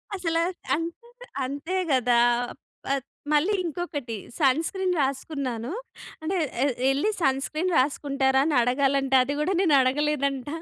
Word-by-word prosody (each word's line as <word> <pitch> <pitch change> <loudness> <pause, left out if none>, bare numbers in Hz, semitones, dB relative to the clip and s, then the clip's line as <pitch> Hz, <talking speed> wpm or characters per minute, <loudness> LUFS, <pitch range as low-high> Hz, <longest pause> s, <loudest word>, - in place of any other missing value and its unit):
అసలా, 330 -3 0 0.3
అంతె 335 +9 -6 0.4
అంతే 285 +7 -4 0.2
కదా! 245 -2 +3 0.7
ఆహ్, 275 -2 0 0.3
మళ్ళీ 315 +8 +3
ఇంకొకటి 310 -8 -4 0.3
సన్క్రీన్ 330 +7 +2
రాసుకున్నాను. 265 -3 -3 0.5
అంటే 360 +4 -1 0.3
ఎ - - +4 0.3
ఎళ్ళి 290 +11 +1
సన్క్రీన్ 305 +6 0
రాసుకుంటారా? 270 -1 +2
అని 310 -2 +1
అడగాలంట. 270 +2 +1
అది 285 - -2
కూడా 365 +6 +1
నేను 330 -6 +3
అడగలేదంట. 280 0 0
280 Hz, 115 wpm, -26 LUFS, 265-330 Hz, 0.7 s, ఎ